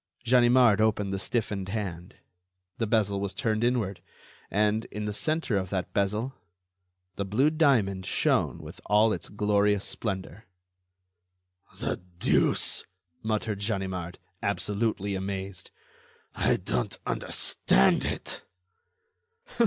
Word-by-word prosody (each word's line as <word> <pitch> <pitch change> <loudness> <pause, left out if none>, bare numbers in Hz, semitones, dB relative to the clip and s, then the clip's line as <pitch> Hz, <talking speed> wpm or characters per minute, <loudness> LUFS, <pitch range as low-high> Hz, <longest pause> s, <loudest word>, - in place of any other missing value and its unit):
Ganimard 120 -3 +5
opened 105 -2 +1
the 95 - -2
stiffened 100 -3 -2
hand. 95 -4 -4 0.6
The 115 - 0
bezel 105 -3 +1
was 100 -1 -3
turned 110 0 0
inward, 115 -6 0 0.5
and, 105 +2 +1
in 105 0 -5
the 105 - -2
centre 155 0 0
of 95 -1 -2
that 95 -1 -3
bezel, 105 +6 0 0.8
the 100 - 0
blue 120 +10 +2
diamond 110 - +2
shone - - +1
with - - -11
all 105 +2 +4
its - - -5
glorious 105 -1 +2
splendor. 95 0 -4 1.3
"The - - -2 0.2
deuce!" - - +2 0.4
muttered 110 -2 -1
Ganimard, 95 -4 -3 0.2
absolutely 100 0 -1
amazed, 95 -1 -4 0.6
"I - - +2
don't - - -2
understand 65 - +2
it." - - -3
105 Hz, 110 wpm, -28 LUFS, 95-110 Hz, 1.3 s, Ganimard